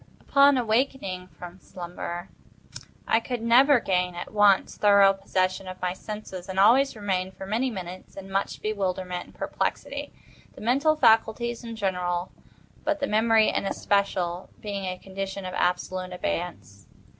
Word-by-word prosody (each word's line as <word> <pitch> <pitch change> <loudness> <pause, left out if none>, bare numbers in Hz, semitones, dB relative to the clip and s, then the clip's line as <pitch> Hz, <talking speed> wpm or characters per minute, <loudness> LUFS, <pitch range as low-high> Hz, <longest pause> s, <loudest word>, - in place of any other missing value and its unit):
Upon 280 0 +5
awaking 225 -6 -1
from 180 0 -11
slumber, 175 0 -7 0.8
I 225 - +4
could 235 0 -5
never 255 +4 +6
gain, 180 -3 0
at 175 - -7
once, 205 -2 +4
thorough 200 -1 +6
possession 185 -1 -1
of 185 0 -7
my 180 0 -1
senses, 190 -2 -8
and 190 0 -2
always 255 +7 +5
remained, 190 -3 -2
for 190 - -7
many 230 +6 0
minutes, 185 -4 -8
in 195 0 -9
much 195 +1 -2
bewilderment 185 -4 -2
and - - -19
perplexity—the - - -5
mental 275 +8 +2
faculties 235 -2 +2
in 230 -1 -6
general, 180 -3 -2 0.5
but 305 0 0
the 280 - 0
memory 220 -1 +3
in - - -1
especial, 185 -3 -1
being 200 -2 -4
in 185 - -2
a - - -17
condition 195 +1 -6
of 185 - -5
absolute 185 +1 -1
abeyance. 165 - -5
195 Hz, 145 wpm, -26 LUFS, 185-225 Hz, 0.8 s, never